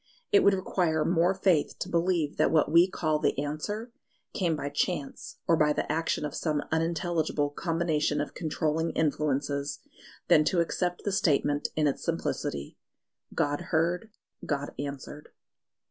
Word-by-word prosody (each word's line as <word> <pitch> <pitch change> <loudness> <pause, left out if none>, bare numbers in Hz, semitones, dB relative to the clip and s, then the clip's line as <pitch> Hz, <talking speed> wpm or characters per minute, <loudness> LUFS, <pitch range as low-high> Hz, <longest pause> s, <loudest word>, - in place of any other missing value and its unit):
It 410 - +7
would 200 - +5
require 175 -4 0
more 175 +2 +3
faith 185 -5 +2
to - - -4
believe 170 -3 0
that - - +3
what 155 -2 +2
we 170 +3 +6
call 155 -4 0
the - - +1
Answer 155 - -3 0.4
came 170 -4 0
by 145 -1 -3
chance 145 0 -3
or 170 - +5
by 150 -1 +3
the - - -2
action 160 -1 0
of 145 - -4
some 150 -3 -1
unintelligible 160 -2 0
combination 160 -2 0
of 145 - -3
controlling 160 0 -1
influences, 145 -2 0 0.5
than 155 - +6
to 175 - +2
accept 175 +1 -1
the 205 - -1
statement 145 -5 +1
in 155 - +2
its 140 - 0
simplicity 70 0 -3 0.6
God 145 +2 0
heard: 175 +6 +1 0.3
God 145 -1 -2
answered. 145 +1 -6
155 Hz, 145 wpm, -28 LUFS, 145-175 Hz, 0.6 s, It